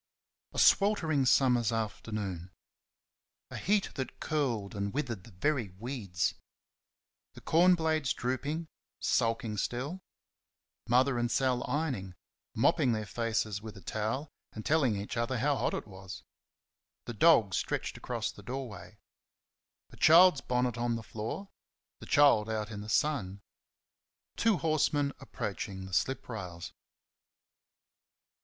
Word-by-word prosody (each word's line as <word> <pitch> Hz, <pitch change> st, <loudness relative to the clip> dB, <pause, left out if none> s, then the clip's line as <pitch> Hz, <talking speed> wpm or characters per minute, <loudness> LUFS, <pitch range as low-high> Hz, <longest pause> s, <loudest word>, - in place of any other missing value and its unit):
A -, -, -10 dB
sweltering 160 Hz, -10 st, +4 dB
summer's 125 Hz, -3 st, +4 dB
afternoon. 105 Hz, -5 st, -3 dB, 1.0 s
A -, -, -5 dB
heat 205 Hz, +1 st, +1 dB
that 130 Hz, -2 st, -5 dB
curled 120 Hz, -10 st, -1 dB
and 100 Hz, 0 st, -2 dB
withered 120 Hz, -8 st, -3 dB
the 115 Hz, -, -14 dB
very 115 Hz, +3 st, 0 dB
weeds. 105 Hz, -7 st, -2 dB, 1.0 s
The -, -, -13 dB
corn 180 Hz, +3 st, +5 dB
blades 160 Hz, -4 st, 0 dB
drooping, 145 Hz, +6 st, -2 dB, 0.3 s
sulking 115 Hz, -3 st, 0 dB
still. 135 Hz, -, -3 dB, 0.9 s
Mother 125 Hz, +1 st, +3 dB
and 120 Hz, 0 st, 0 dB
Sal 130 Hz, -1 st, +1 dB
ironing, 130 Hz, -, -2 dB, 0.4 s
mopping 125 Hz, -, +3 dB
their 110 Hz, -1 st, -2 dB
faces 110 Hz, -2 st, -2 dB
with 110 Hz, -2 st, -9 dB
a -, -, -11 dB
towel 110 Hz, -, -3 dB, 0.2 s
and 110 Hz, -, -7 dB
telling 140 Hz, -8 st, +3 dB
each 105 Hz, +4 st, -5 dB
other 120 Hz, +2 st, 0 dB
how 140 Hz, +4 st, +2 dB
hot -, -, 0 dB
it -, -, -4 dB
was. 95 Hz, -3 st, -10 dB, 0.8 s
The 120 Hz, -, -5 dB
dog 110 Hz, -, +5 dB
stretched -, -, -2 dB
across -, -, -3 dB
the -, -, -13 dB
doorway. 125 Hz, 0 st, -7 dB, 0.9 s
A -, -, -14 dB
child's 170 Hz, -1 st, +7 dB
bonnet 125 Hz, -1 st, 0 dB
on 120 Hz, 0 st, 0 dB
the 115 Hz, -, -5 dB
floor 110 Hz, -, -6 dB, 0.5 s
the -, -, -11 dB
child 140 Hz, -7 st, +5 dB
out 110 Hz, -1 st, -3 dB
in 105 Hz, -1 st, -6 dB
the 105 Hz, -, -8 dB
sun. 105 Hz, -9 st, 0 dB, 0.9 s
Two 225 Hz, -4 st, +3 dB
horsemen 150 Hz, -3 st, +1 dB
approaching 95 Hz, -1 st, -5 dB
the 95 Hz, -, -10 dB
slip 135 Hz, +8 st, 0 dB
rails. 90 Hz, -7 st, -7 dB
120 Hz, 130 wpm, -31 LUFS, 105-145 Hz, 1.0 s, child's